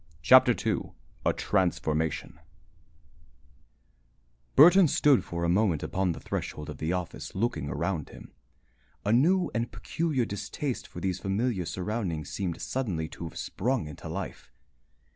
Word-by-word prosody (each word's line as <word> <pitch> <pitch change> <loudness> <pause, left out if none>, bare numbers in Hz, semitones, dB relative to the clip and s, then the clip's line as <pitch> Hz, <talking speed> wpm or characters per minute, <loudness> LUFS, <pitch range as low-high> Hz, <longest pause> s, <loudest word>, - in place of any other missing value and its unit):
CHAPTER 80 - +7
II - - -1 0.3
A - - +5
TRANSFORMATION 80 -5 -1 2.2
Burton 175 +5 +8
stood 145 -2 +4
for 85 0 -4
a - - +2
moment 90 -3 +2
upon 95 -2 0
the - - -8
threshold 75 0 -4
of 75 - -10
the 80 +2 -1
office, 90 -2 -4
looking 95 - -1
around 80 +3 -2
him. - - -13 0.7
A 105 - +3
new 175 +10 +3
and 115 0 -1
peculiar 130 - -1
distaste 115 +6 -4
for - - -9
these 95 -2 -1
familiar 100 0 -1
surroundings 90 -4 -3
seemed 90 -4 -3
suddenly 95 -12 -2
to 85 - -8
have 80 - -8
sprung 125 -1 -1
into 75 - -8
life. - - -6
95 Hz, 135 wpm, -28 LUFS, 80-120 Hz, 2.2 s, Burton